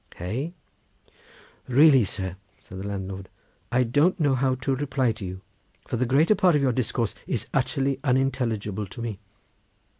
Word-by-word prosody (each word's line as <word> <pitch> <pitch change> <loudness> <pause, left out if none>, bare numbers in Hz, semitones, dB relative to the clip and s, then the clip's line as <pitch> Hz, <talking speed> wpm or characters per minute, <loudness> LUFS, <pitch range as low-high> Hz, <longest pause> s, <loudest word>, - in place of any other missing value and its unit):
Hey?" 125 - -4 1.1
"Really, 135 -1 +6
sir," 95 -2 -4 0.2
said 95 - -10
the 100 - -5
landlord, 95 -1 -5 0.4
"I 125 +1 +3
don't 145 +10 +2
know 145 -4 +3
how 130 0 +1
to 135 +1 -1
reply 130 -3 0
to 110 -1 -8
you, 95 0 -6 0.5
for - - -2
the 125 +1 0
greater 150 - +4
part 180 -5 +4
of 145 - +2
your 130 - +3
discourse 115 -2 -1
is - - -2
utterly 135 0 0
unintelligible 125 -7 0
to 95 - -11
me. 115 -4 -4
125 Hz, 155 wpm, -25 LUFS, 100-135 Hz, 1.1 s, Really